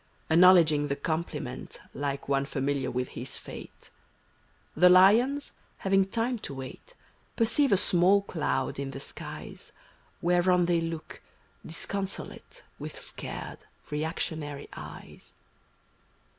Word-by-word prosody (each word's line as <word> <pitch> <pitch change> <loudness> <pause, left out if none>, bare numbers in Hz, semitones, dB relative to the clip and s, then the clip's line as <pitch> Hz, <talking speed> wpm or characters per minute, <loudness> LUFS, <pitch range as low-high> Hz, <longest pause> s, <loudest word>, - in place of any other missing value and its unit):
Acknowledging 165 -4 +6
the 140 - -1
compliment 150 -4 -4
Like 140 0 -3
one 140 0 +1
familiar 140 -2 -1
with 125 0 -2
his - - -6
fate; - - -11 0.8
The 180 +3 +7
lions, 225 +10 +5 0.2
having 195 0 +3
time 230 +3 -1
to 140 - -6
wait, 135 - -9 0.4
Perceive 235 +5 +3
a 200 - +6
small 190 +1 +4
cloud 150 -8 -2
in 140 -1 -3
the 135 - -7
skies. - - -7 0.5
Whereon 180 +1 +3
they 170 -1 +2
look, 165 -1 -6 0.4
disconsolate. 195 - -5 0.2
With - - -7
scared, - - -6 0.3
reactionary 150 -1 -3
eyes. - - -10
170 Hz, 110 wpm, -28 LUFS, 140-195 Hz, 0.8 s, The